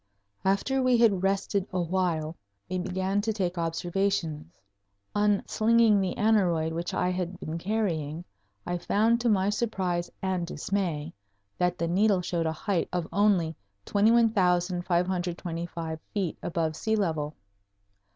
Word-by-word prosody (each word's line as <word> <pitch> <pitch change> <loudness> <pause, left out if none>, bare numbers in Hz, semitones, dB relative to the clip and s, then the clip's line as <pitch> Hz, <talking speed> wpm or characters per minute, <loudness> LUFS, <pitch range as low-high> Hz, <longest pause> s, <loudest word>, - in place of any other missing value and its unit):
After 200 +8 +1
we 255 -1 +4
had 215 -6 +4
rested 195 0 0
awhile 170 -3 -1 0.3
we 185 0 -2
began 190 +2 -1
to 220 +2 -1
take 185 -4 -2
observations. 165 - -2 0.5
Unslinging 210 +1 +3
the 185 -2 -1
aneroid 180 -7 +2
which 170 +1 -3
I 180 - 0
had 180 0 -3
been 160 +2 -4
carrying, 175 -6 -2 0.4
I 175 0 -2
found 225 +6 +2
to 240 - +2
my 200 -1 +3
surprise 185 -6 -1
and 185 -3 -1
dismay 170 -3 -2 0.5
that 180 0 +1
the 170 - -1
needle 195 +2 +3
showed 170 -2 -1
a - - +1
height 175 +2 -1
of 175 -2 -2
only 190 -6 +3 0.3
21,525 180 -5 +1
feet 190 -6 -2
above 165 -2 -1
sea 220 +6 0
level. 160 -7 -1
185 Hz, 125 wpm, -28 LUFS, 170-205 Hz, 0.5 s, we